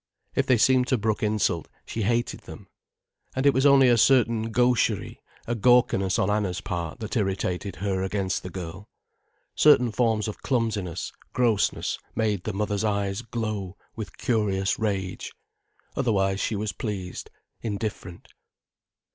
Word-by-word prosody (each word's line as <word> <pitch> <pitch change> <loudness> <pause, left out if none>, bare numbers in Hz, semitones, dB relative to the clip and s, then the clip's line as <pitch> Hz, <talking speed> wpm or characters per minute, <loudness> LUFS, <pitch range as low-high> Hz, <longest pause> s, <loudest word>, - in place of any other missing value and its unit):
If - - 0
they 130 - +5
seemed 125 +2 +4
to 130 - +2
brook 110 -2 -1
insult, 105 -6 0 0.2
she 115 - -4
hated 120 +3 0
them. - - -11 0.7
And 130 +1 -1
it 140 - +6
was 135 +2 +4
only 135 -2 +6
a 120 -1 +4
certain 115 -3 +3
gaucherie, 125 +1 +1 0.2
a 120 - -1
gawkiness 115 -5 +3
on - - +1
Anna's 105 -3 0
part 85 +1 -4
that 110 +2 -4
irritated 95 -3 -1
her 95 +1 -2
against 95 -1 -1
the 90 - -7
girl. 95 +2 -8 0.6
Certain 125 -6 +5
forms 110 -1 +1
of 110 - -6
clumsiness, 105 -9 -1 0.2
grossness, 115 -5 +1 0.2
made 105 -5 0
the 110 - -1
mother's 105 +1 -1
eyes 100 -1 -1
glow 110 -5 -4 0.2
with 110 -2 -7
curious 100 -5 0
rage. 95 -4 -3 0.6
Otherwise 100 -6 +1
she 110 - -1
was 105 +1 -2
pleased, 95 -3 -5 0.3
indifferent. 105 -5 -5
105 Hz, 140 wpm, -26 LUFS, 95-115 Hz, 0.7 s, it